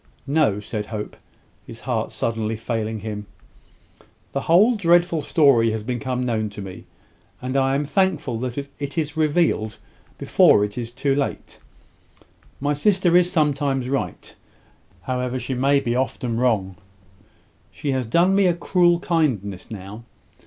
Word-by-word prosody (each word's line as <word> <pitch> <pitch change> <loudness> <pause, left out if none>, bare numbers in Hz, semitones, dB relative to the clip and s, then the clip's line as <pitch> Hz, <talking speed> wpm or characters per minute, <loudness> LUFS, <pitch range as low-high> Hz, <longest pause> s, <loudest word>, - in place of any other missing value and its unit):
"No," 140 -8 +2
said 105 0 -5
Hope, 105 -2 -6 0.5
his - - -11
heart - - -2
suddenly 115 -1 -2
failing 110 -1 -3
him. 105 -1 -6 1.0
"The 140 - -2
whole 195 - +5
dreadful 175 -5 +3
story 140 -8 +4
has 110 -1 -3
become 125 +1 -2
known 110 -3 -1
to - - -4
me; 95 -1 -9 0.5
and 130 +1 -4
I 135 0 +2
am 145 +1 0
thankful 155 - 0
that 125 +1 -4 0.2
it 140 +2 -5
is 155 -1 -1
revealed 155 - +1 0.4
before 105 - +4
it 105 - -8
is 120 -1 -4
too 135 +3 0
late. 140 0 -3 1.0
My 145 +2 0
sister 180 +3 +2
is 180 0 +4
sometimes 145 -6 0
right, 135 0 -3 0.7
however 125 0 -2
she 125 +1 -4
may 135 +3 +3
be 120 -3 -2
often 125 -2 -1
wrong. 100 -7 0 0.9
She 140 - -3
has 130 -3 -1
done 170 +10 +3
me 195 -1 +4
a 175 - +2
cruel 175 0 +2
kindness 115 - -1
now. 105 +2 -8
130 Hz, 145 wpm, -22 LUFS, 115-155 Hz, 1.0 s, whole